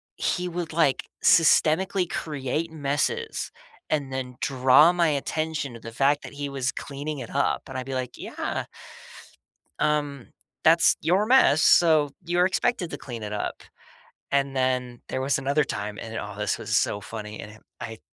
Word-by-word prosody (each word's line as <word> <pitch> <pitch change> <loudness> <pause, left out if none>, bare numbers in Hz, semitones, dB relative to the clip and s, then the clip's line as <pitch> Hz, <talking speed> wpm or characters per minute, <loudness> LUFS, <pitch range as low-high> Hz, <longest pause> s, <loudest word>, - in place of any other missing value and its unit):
he 180 0 -1
would, 175 -1 -4
like, 155 -5 +2 0.2
systemically 175 +3 +4
create 150 +2 -3
messes 160 - -2 0.4
and 140 -3 -1
then 125 -1 -5
draw 135 +5 +5
my 170 -2 +2
attention 150 -1 -2
to 115 - -10
the 115 - -8
fact 140 +5 +2
that - - -8
he 145 0 -4
was 135 -2 -1
cleaning 145 +1 -6
it 120 - -7
up. - - 0
And - - -6
I'd 130 - -4
be 135 - -5
like, 130 -1 -4
"Yeah. - - -4 1.2
Um, 145 -4 -1 0.3
that's 165 +1 +5
your 185 +5 +2
mess, 245 - +5
so 160 -3 +5 0.2
you're 175 +1 +2
expected 185 -1 0
to - - -5
clean 120 -4 -8
it 105 - -5
up." 105 - -4 0.7
And 140 -1 +1
then 125 -2 -1
there - - -3
was 135 +1 +1
another 140 +3 +1
time, 105 -6 -5
and 115 0 -7
oh, 105 0 -6
this 105 - -1
was - - -1
so 105 - +1
funny. 105 0 -7
And 105 +1 -11 0.2
i 110 - -5
I 110 - -10
140 Hz, 170 wpm, -25 LUFS, 125-160 Hz, 1.2 s, draw